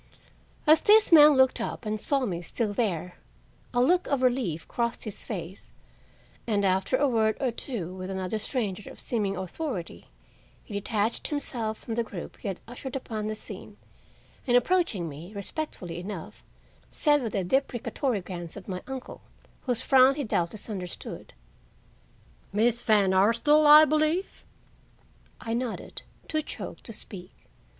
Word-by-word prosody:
As 310 +1 +6
this 425 -1 +5
man 300 -2 +9
looked 260 -1 +4
up - - -4
and 215 0 -2
saw 275 -2 +1
me 175 -5 -3
still 210 +4 -2
there, 180 -6 -2 0.5
a 245 - 0
look 355 +7 +3
of 275 -2 0
relief 240 -11 0
crossed 235 0 -2
his 215 -2 -5
face, 190 -3 -7 0.8
and, 205 -3 +1
after 190 +6 +2
a 285 +2 +3
word 220 -3 +2
or 260 -3 0
two 220 - -5
with 185 0 -6
another 190 +2 -2
stranger 210 -4 -3
of - - -11
seeming 205 -6 -1
authority, 190 - -5 0.6
he 215 - -11
detached 210 +2 -1
himself 235 -7 -3
from 230 - -6
the 235 +1 0
group 195 -5 -8
he - - -7
had 190 -2 -3
ushered 250 +2 -7
upon 220 -5 -4
the 215 - -2
scene, - - -10 0.7
and, 245 -1 +5
approaching 245 - +1
me 160 +6 -9
respectfully 200 - -5
enough, 185 -2 -7 0.5
said 295 -2 +2
with 230 -4 -3
a 195 - +1
deprecatory 245 +1 -1
glance 175 -2 -7
at 195 - -10
my 185 -1 -4
uncle 265 -1 -7 0.5
whose 245 -1 0
frown 265 0 +6
he 290 - -2
doubtless 200 -3 -2
understood: 185 -5 -7 1.2
"Miss 235 +3 +2
Van 205 -5 +3
Arsdale, 235 +10 +4
I 300 +1 +10
believe?" 310 +5 0 1.0
I 225 - -4
nodded, 240 -1 -4 0.3
too 310 -1 0
choked - - -7
to - - -8
speak. 185 -4 -11
225 Hz, 150 wpm, -27 LUFS, 195-265 Hz, 1.2 s, I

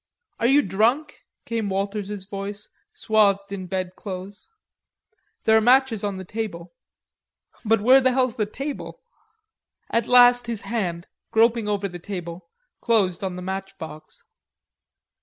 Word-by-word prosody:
"Are 230 - +2
you 280 +3 +5
drunk?" 225 - 0 0.2
came 225 -3 -2
Walters's 200 0 -3
voice 200 +1 -6 0.2
swathed 200 -3 +1
in 190 -2 -5
bedclothes. 185 - -6 0.9
"There 220 - +4
are 220 - +5
matches 245 -2 +3
on 200 -2 -2
the 190 - -7
table." 180 -5 -6 0.9
"But 225 -1 +2
where 260 +5 +6
the 260 0 +3
hell's 255 -2 +1
the 215 -2 -1
table?" 275 +6 -7 0.9
At 230 -1 +1
last 245 -1 +6
his 230 -3 -4
hand, 180 -7 -3 0.2
groping 230 0 +2
over 205 -1 -1
the 175 -2 -9
table, 170 -2 -7 0.3
closed 200 -6 +1
on 185 -2 -3
the 180 - -7
matchbox. 190 -5 -7
205 Hz, 130 wpm, -23 LUFS, 190-230 Hz, 0.9 s, where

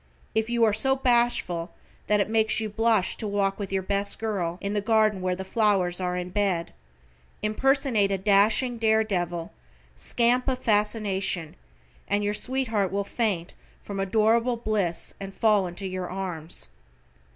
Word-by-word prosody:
If 220 +1 0
you 235 -1 +1
are 220 -2 +4
so 265 +6 +3
bashful 240 -9 +1 0.3
that 210 0 +3
it 200 - +1
makes 220 0 +2
you 220 -1 -2
blush 220 -2 +2
to 215 - -3
walk 200 -1 0
with 200 -2 -5
your 190 -1 -1
best 200 +1 0
girl, 190 -6 -2
in 200 +1 -3
the 205 - 0
garden 215 -2 +2
where 185 0 0
the 190 +1 -6
flowers 190 -4 +1
are 180 0 -1
in 180 0 -4
bed, 190 -4 0 0.7
impersonate 230 -2 +2
a 195 - +1
dashing, 215 +5 +3
dare 220 -1 +3
devil, 175 -5 -3 0.4
scamp 245 +2 +1
of 260 -1 +1
fascination, 205 -7 0 0.5
and 205 +1 0
your 205 0 0
sweetheart 225 -5 -1
will 200 +1 -1
faint 200 -5 -2 0.3
from 200 -1 -6
adorable 225 +5 +2
bliss 210 -7 -2
and 195 0 -7
fall 210 -4 +3
into 175 +3 -7
your 185 -1 -4
arms. 175 - -5
205 Hz, 160 wpm, -26 LUFS, 190-225 Hz, 0.7 s, are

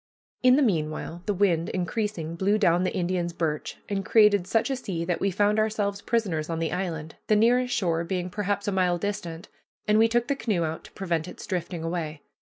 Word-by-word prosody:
In 255 0 +6
the 290 - +4
meanwhile, 165 - -1
the 205 - +2
wind, 175 -4 +2
increasing, 180 -3 -2
blew 195 +4 +2
down 180 -4 +3
the - - -2
Indian's 175 -1 -1
birch 160 -3 -2
and 195 -1 -2
created 205 -3 +4
such 225 +7 +1
a - - +1
sea 180 -9 -4
that 175 -1 -1
we 195 - +1
found 205 +3 +2
ourselves 210 -2 0
prisoners 190 -11 -1
on 165 - -2
the 165 0 -1
island, 165 -4 -4
the 215 - +4
nearest 245 +3 +3
shore 170 -4 +1
being 180 0 -3
perhaps 205 0 -2
a - - +2
mile 180 -2 +2
distant, 175 -3 -4 0.4
and 210 +1 +4
we 225 - +6
took 240 +1 +1
the 280 - +1
canoe 210 -10 0
out 160 0 -4
to - - -13
prevent 170 -4 -2
its - - -9
drifting 175 -2 -3
away. 160 -3 -3
185 Hz, 205 wpm, -26 LUFS, 170-210 Hz, 0.4 s, In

